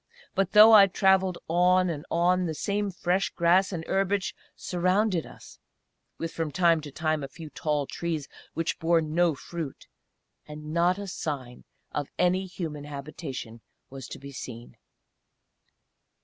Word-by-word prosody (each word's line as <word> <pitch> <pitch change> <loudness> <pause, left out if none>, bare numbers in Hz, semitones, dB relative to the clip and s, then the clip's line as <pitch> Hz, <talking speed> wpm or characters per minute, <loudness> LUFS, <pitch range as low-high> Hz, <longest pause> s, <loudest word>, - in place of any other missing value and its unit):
But 195 -1 0
though 215 +1 +9
I 200 -2 +9
travelled 190 -1 +2
on 180 +2 +3
and 160 -1 -4
on, 180 +2 +2
the 160 - -3
same 205 +4 -1
fresh 185 +1 0
grass 180 +3 +3
and 165 -3 -4
herbage 195 0 0 0.2
surrounded 185 0 0
us, - - -14 0.6
with 165 0 -4
from 160 -2 -3
time 170 -1 +3
to 145 -1 -9
time 155 0 -1
a - - -4
few 155 +2 -11
tall 150 -2 -1
trees 160 -1 -4 0.3
which 165 +1 -2
bore 165 0 +3
no 160 +1 +1
fruit; 160 0 -7 0.6
and 150 0 -8
not 175 +2 +3
a 200 - -5
sign 140 -9 -5 0.3
of 145 -2 -3
any 185 +2 +2
human 160 -5 -6
habitation 140 -5 -7 0.3
was 135 -2 -8
to - - -8
be 140 +1 -10
seen. 120 -2 -9
170 Hz, 150 wpm, -27 LUFS, 150-185 Hz, 0.6 s, though